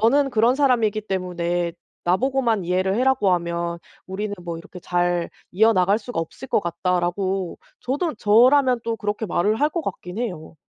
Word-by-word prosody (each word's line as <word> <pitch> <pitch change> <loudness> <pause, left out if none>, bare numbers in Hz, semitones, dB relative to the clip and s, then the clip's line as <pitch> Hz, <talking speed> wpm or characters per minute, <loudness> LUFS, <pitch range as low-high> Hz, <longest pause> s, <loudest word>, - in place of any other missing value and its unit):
너는 275 +5 +3
그런 235 +2 +3
사람이기 240 -7 +2
때문에 175 -2 -1 0.3
나보고만 230 +2 +1
이해를 185 +2 +1
해라고 250 -5 +2
하면 170 -1 -2 0.3
우리는 205 +2 -4
뭐 170 -1 -4
이렇게 175 +2 -11
잘 175 -1 0 0.2
이어나갈 200 0 +3
수가 235 -5 -4
없을 165 +11 -7
것 215 - +1
같다."라고 180 +1 -1 0.2
저도 290 +4 -2
저라면 250 +5 +4
또 230 - -1
그렇게 210 +1 -3
말을 210 +6 0
할 295 - +4
것 335 +1 -3
같긴 185 - -6
해요. 175 -10 -5
200 Hz, 345 characters per minute, -23 LUFS, 175-240 Hz, 0.3 s, 저라면